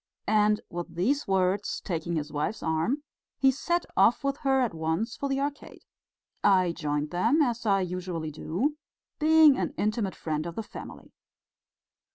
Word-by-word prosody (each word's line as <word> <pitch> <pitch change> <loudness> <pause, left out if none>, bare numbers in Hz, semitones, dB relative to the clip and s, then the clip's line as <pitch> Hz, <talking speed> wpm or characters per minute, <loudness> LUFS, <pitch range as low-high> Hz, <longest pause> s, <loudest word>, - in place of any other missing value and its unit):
And 210 0 +3
with 175 -1 -6
these 265 +12 0
words, 190 +1 +1
taking 170 -2 -3
his 150 -1 -3
wife's 155 +9 -2
arm, 165 - 0 0.3
he 270 -1 +4
set 345 +6 -1
off 225 +8 +4
with 275 0 0
her 270 -2 +2
at 240 -7 0
once 160 +8 -2
for 280 - -3
the 270 0 0
Arcade. 285 +1 -5 0.6
I 185 -3 +4
joined 150 -2 -2
them, 225 - +2
as 235 -3 -2
I 195 -1 +3
usually 180 -3 -4
do, 215 - -2 0.4
being 310 -2 +6
an - - -2
intimate 210 -2 -1
friend 155 0 -3
of 170 - -7
the 225 - -3
family. - - -10
200 Hz, 160 wpm, -28 LUFS, 170-265 Hz, 0.6 s, being